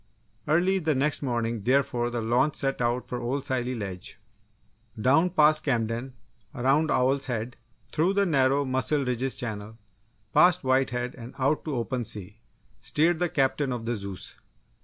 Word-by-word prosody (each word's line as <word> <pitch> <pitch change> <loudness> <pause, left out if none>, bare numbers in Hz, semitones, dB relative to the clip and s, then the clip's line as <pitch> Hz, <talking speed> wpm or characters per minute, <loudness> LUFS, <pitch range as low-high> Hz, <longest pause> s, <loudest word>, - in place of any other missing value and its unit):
Early 180 +5 +3
the 155 -4 0
next 145 +3 0
morning, 120 -4 -1
therefore, 120 0 +1
the 120 -1 -3
launch 125 +6 +2
set 135 -2 -1
out 120 +1 0
for 125 - -4
old 135 +3 -2
Scilly 130 -2 -1
Ledge. 100 -2 -6 0.8
Down 145 +10 +4
past 155 -3 +4
Camden, 120 0 -1 0.4
around 140 +5 +2
Owl's 135 +2 +1
Head, 120 -1 -3 0.4
through 170 +5 +2
the 200 0 +3
narrow 140 -3 +2
Mussel 130 +2 0
Ridges 125 +1 -1
Channel, 110 -3 -5 0.6
past 175 -3 +5
White 130 0 +2
Head 125 0 -3
and 120 -1 -10
out 140 +3 +1
to 150 -3 -2
open 125 +1 -2
sea, 105 0 -6 0.4
steered 155 +9 +1
the 175 -1 +1
Captain 135 -3 +1
of 120 -2 -4
the 120 +1 -1
Zeus! 100 -3 -7
130 Hz, 160 wpm, -27 LUFS, 120-145 Hz, 0.8 s, past